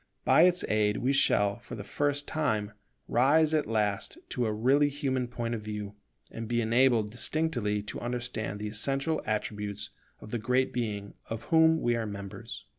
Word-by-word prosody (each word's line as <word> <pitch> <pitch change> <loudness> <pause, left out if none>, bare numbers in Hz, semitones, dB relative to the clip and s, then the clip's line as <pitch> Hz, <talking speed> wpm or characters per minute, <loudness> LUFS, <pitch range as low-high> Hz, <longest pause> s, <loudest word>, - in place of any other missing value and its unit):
By 165 - +6
its 180 0 +2
aid 105 -1 +2
we 130 +3 +1
shall 105 -5 +3
for - - -9
the 100 - -6
first 145 +5 0
time 110 -10 -1 0.4
rise 150 +6 +4
at 155 -1 +1
last 105 - -1
to 125 -3 -1
a - - 0
really 135 +7 +3
human 135 -3 -1
point 120 -1 -3
of 115 - -3
view, 105 -1 -5 0.4
and 115 0 -6
be 120 +1 0
enabled 115 -1 +3
distinctly 120 -6 -1
to 105 - -6
understand 120 -4 -3
the 105 - -3
essential 135 +8 0
attributes 105 -1 -3 0.3
of 110 - -11
the 120 - -1
Great 125 +4 +1
Being 105 -4 -3 0.2
of 115 +1 -4
whom 160 -1 +5
we 120 0 +2
are 115 -2 -2
members. 100 -1 -7
120 Hz, 175 wpm, -29 LUFS, 105-135 Hz, 0.4 s, By